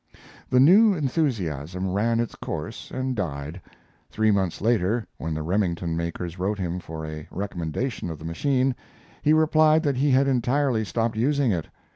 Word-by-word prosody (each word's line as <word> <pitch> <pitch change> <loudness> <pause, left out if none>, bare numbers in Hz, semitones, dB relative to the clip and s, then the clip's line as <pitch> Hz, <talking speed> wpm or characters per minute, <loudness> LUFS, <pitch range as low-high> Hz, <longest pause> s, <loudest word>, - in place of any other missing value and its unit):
] - - -23
The 125 - +4
new 195 - +6
enthusiasm 95 - -1
ran 115 +4 +1
its 120 - -2
course - - -6
and 130 0 -2
died. 80 -3 -4 0.5
Three 110 0 +2
months 95 -4 0
later, 110 0 +1
when 80 -1 -3
the 80 - -3
Remington 85 -2 -1
makers 85 +1 -4
wrote 100 +3 -1
him 90 -2 -3
for 80 -2 -7
a 75 -1 -7
recommendation 95 - -3
of 80 - -5
the 80 - -10
machine, 130 - +1 0.5
he 150 - +3
replied 155 0 +4
that 140 -4 0
he 145 +3 +2
had 135 +1 +4
entirely 130 -2 +1
stopped 115 +1 -1
using 140 +1 +2
it. 85 -5 -2
110 Hz, 165 wpm, -25 LUFS, 85-135 Hz, 0.5 s, new